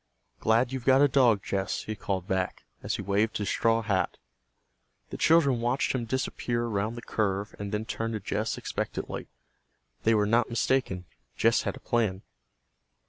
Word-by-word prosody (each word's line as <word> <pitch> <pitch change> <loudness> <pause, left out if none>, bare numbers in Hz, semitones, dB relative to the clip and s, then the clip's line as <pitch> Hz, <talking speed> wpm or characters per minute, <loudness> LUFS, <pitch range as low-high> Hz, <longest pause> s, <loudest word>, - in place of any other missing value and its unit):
"Glad 115 +3 +3
you've 130 -2 -3
got 135 +2 +5
a - - +7
dog, 125 -7 +4
Jess," 95 -1 -2
he 110 - -4
called 95 -2 -3
back, 95 -2 -2 0.2
as - - -2
he - - -4
waved 100 +3 +1
his 105 - -2
straw 115 0 +2
hat. 100 -4 0 0.9
The - - -4
children 140 -7 +4
watched 120 +3 +1
him 125 -3 -1
disappear 120 -1 -1
around 110 0 -1
the 120 - -8
curve 100 -2 -1
and 100 -1 -4
then 105 +1 -2
turned 115 0 -3
to - - -2
Jess 95 - -2
expectantly. - - -4 0.7
They 115 0 +3
were 105 -1 +3
not 115 +2 +2
mistaken. 115 -6 0 0.3
Jess - - +4
had - - -3
a - - -15
plan. 105 -5 0
110 Hz, 170 wpm, -28 LUFS, 100-120 Hz, 0.9 s, a